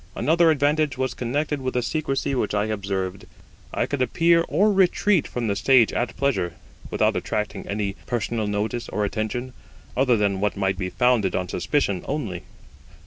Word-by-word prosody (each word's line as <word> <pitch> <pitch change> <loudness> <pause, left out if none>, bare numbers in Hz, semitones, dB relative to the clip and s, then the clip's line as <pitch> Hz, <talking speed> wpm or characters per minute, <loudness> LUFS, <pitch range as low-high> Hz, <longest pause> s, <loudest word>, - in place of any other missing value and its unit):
Another 165 +2 +3
advantage 150 -2 +2
was 130 -1 -1
connected 145 +4 -2
with 130 -1 -3
the 125 - +1
secrecy 135 +1 -1
which 110 -5 -1
I 105 0 +1
observed. 95 -3 -3 0.4
I - - 0
could 145 -2 -3
appear 170 +5 +3
or 205 +7 +3
retreat 190 -1 +3
from 120 -1 -3
the 100 -2 0
stage 115 +3 +4
at 120 - -2
pleasure, 135 -11 0 0.4
without - - +1
attracting 105 -1 -3
any 100 -1 -2
personal 115 -2 -1
notice 105 +4 -2
or 105 - -1
attention, 110 +5 -3 0.4
other 125 -2 +3
than 100 -2 +1
what 105 0 -1
might 95 -1 0
be 90 -1 -2
founded 125 -3 +2
on 90 -1 -1
suspicion 100 -2 0
only. 115 - -3
120 Hz, 165 wpm, -24 LUFS, 105-140 Hz, 0.4 s, stage